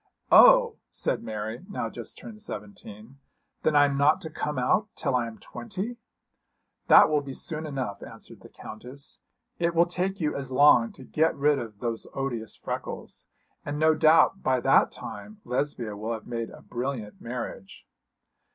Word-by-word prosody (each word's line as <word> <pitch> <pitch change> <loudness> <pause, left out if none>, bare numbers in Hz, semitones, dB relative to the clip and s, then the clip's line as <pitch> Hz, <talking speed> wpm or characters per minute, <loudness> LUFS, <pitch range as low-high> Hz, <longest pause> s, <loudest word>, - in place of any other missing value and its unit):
'Oh!' - - +7
said - - -1
Mary, 110 +5 -5
now 200 - -3
just - - -7
turned 215 -2 -10
seventeen, 135 - -9 0.4
'then 155 - +1
I 145 0 +7
am 140 -1 -1
not 145 +2 +4
to 160 - -7
come 150 -2 -3
out 180 +12 +2
till - - -1
I 120 -2 +1
am 110 -1 -9
twenty.' 225 +2 -6 0.9
'That - - +8
will 150 -1 +1
be 135 -2 -8
soon 155 0 -3
enough,' 130 -9 -4
answered - - -10
the - - -14
Countess. 125 +6 -8 0.4
'It 170 0 0
will 170 +1 +5
take 185 +2 -2
you 155 -3 -1
as 135 -2 -5
long 130 -4 +5
to - - -12
get 160 +5 +1
rid 145 0 +3
of 110 -4 -8
those 115 -2 -3
odious 120 -5 -3
freckles. - - -6 0.4
And 145 +1 -4
no 155 +1 +4
doubt 160 +5 +4
by 130 -1 +2
that - - +4
time 215 0 -9
Lesbia 125 -4 -2
will 110 +3 -3
have 110 - -7
made 115 -2 -4
a - - -13
brilliant 120 -4 -5
marriage.' 115 -5 -7
140 Hz, 170 wpm, -27 LUFS, 115-160 Hz, 0.9 s, That